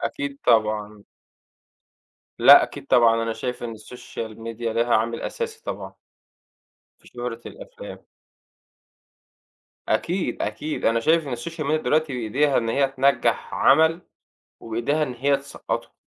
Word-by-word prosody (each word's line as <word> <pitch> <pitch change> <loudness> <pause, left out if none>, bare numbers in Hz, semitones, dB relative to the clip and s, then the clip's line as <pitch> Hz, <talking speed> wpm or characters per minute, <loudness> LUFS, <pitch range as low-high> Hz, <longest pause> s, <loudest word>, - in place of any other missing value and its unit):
أكيد 285 -1 -4
طبعًا. 105 -2 +1 1.3
لأ، - - +9
أكيد - - -6
طبعًا 115 -1 +4
أنا 115 0 -2
شايف 125 +2 -5
إن 115 -1 -5
الsocial 110 0 -8
media 115 +1 -5
ليها 120 +1 +1
عامل 115 +2 -1
أساسي 460 -2 -5
طبعًا - - -6 1.1
في - - -19
شهرة - - -6
الأفلام. - - -11 1.8
أكيد، 180 +2 -1
أكيد، 155 +1 -4
أنا 115 0 +3
شايف 160 +5 +2
إن 125 - -3
الsocial 155 +5 -6
media 155 +1 +1
دلوقتي 155 -1 +1
بإيديها 130 +4 +1
إن 115 - -2
هي 135 +4 +2
تنجَّح 135 0 +1
عمل 160 +2 +4 0.6
وبإيديها 120 +7 -1
إن 130 -4 -2
هي 140 +3 +2
تسقّطُه، 140 +1 -6
130 Hz, 125 wpm, -23 LUFS, 115-155 Hz, 1.8 s, لأ